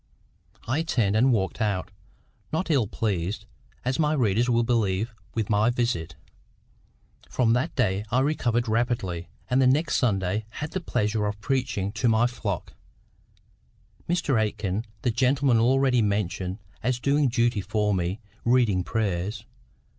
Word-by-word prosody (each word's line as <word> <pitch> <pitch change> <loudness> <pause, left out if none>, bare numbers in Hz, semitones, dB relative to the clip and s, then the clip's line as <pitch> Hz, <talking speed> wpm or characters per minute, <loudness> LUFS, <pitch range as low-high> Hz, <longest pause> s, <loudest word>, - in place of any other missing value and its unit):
I 130 +7 +1
turned 115 -11 +1
and 125 +4 +4
walked 95 -2 0
out, 100 -3 -1 0.6
not 165 +2 -1
ill 130 -8 +3
pleased, 100 -1 -2 0.4
as 130 +3 0
my 150 -1 +3
readers 120 -3 +2
will 120 -1 +3
believe, 115 -1 0 0.2
with 110 -3 0
my 105 +2 +3
visit. 115 -10 -1 1.1
From 115 -3 +2
that 130 +8 0
day 105 -6 +1
I 125 +4 +2
recovered 120 -5 +1
rapidly, 110 -7 -1 0.2
and 130 +2 +2
the 130 - +5
next 145 +5 +2
Sunday 105 -2 0
had 150 +2 -5
the 190 - -3
pleasure 105 -7 0
of 105 0 -4
preaching 125 -5 -1
to 120 +2 +1
my 115 +1 +4
flock; 110 -7 -3 1.4
Mr 145 -9 +2
Aikin, 105 0 -2 0.2
the 120 - +2
gentleman 130 +1 +3
already 130 +1 +3
mentioned 95 -3 -1 0.2
as 125 +1 0
doing 140 +2 +2
duty 120 -3 +1
for 105 +1 0
me, 90 +2 -1 0.2
reading 115 -7 +3
prayers. 100 +1 -2
115 Hz, 140 wpm, -26 LUFS, 100-125 Hz, 1.4 s, the